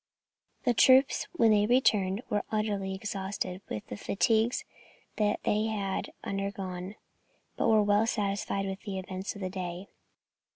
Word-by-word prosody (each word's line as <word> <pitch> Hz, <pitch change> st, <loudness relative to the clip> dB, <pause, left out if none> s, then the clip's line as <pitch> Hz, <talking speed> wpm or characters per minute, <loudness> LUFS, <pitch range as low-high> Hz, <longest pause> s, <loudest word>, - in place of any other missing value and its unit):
The 245 Hz, -, +3 dB
troops, 260 Hz, +3 st, +5 dB
when 230 Hz, -10 st, +4 dB
they 210 Hz, 0 st, +4 dB
returned, 215 Hz, -4 st, +3 dB
were 205 Hz, -, 0 dB
utterly 205 Hz, -3 st, -1 dB
exhausted 190 Hz, -2 st, -4 dB
with 105 Hz, -, -4 dB
the -, -, -7 dB
fatigues 225 Hz, -, +1 dB, 0.5 s
that 210 Hz, -1 st, +1 dB
they 210 Hz, +1 st, +1 dB
had 200 Hz, -3 st, -2 dB
undergone, 195 Hz, -1 st, -4 dB, 0.6 s
but -, -, +1 dB
were 215 Hz, -1 st, +5 dB
well 205 Hz, +2 st, +3 dB
satisfied 200 Hz, -2 st, -1 dB
with 195 Hz, 0 st, -4 dB
the 200 Hz, -3 st, -5 dB
events 190 Hz, +1 st, -5 dB
of 200 Hz, -, -9 dB
the 185 Hz, -, -2 dB
day. 180 Hz, 0 st, -5 dB
200 Hz, 140 wpm, -29 LUFS, 190-215 Hz, 0.6 s, troops